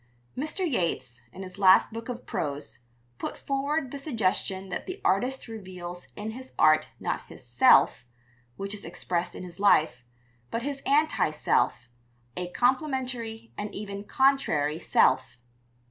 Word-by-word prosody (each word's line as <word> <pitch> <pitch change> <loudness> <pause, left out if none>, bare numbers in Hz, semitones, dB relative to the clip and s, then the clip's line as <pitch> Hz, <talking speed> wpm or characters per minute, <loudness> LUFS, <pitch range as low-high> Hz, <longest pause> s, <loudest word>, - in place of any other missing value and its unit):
Mr. 310 +7 -2
Yeats, 170 - -2
in 190 - -8
his 185 +1 -9
last 190 +2 +6
book 230 +2 -6
of 245 0 -6
prose, 150 -8 -4 0.4
put - - -4
forward 275 0 -1
the 280 - -6
suggestion 195 -7 -1
that 180 - -4
the 370 +2 -5
artist 250 +8 +1
reveals 185 -5 -8
in 215 +1 -4
his 260 +3 -10
art 155 0 +5
not - - -3
his - - -13
"self" - - +5 0.5
(which 195 +1 -4
is 205 - -5
expressed 175 0 -3
in - - -7
his 180 0 -10
life), 155 -11 +4 0.5
but 230 - -3
his 280 0 -3
"anti 300 - +3
self," 150 -4 +1 0.5
a 180 -1 -3
complementary 250 - -1
and 205 0 -5
even 200 -1 -5
contrary 265 - +2
self. 130 -5 +2
210 Hz, 145 wpm, -27 LUFS, 180-260 Hz, 0.5 s, last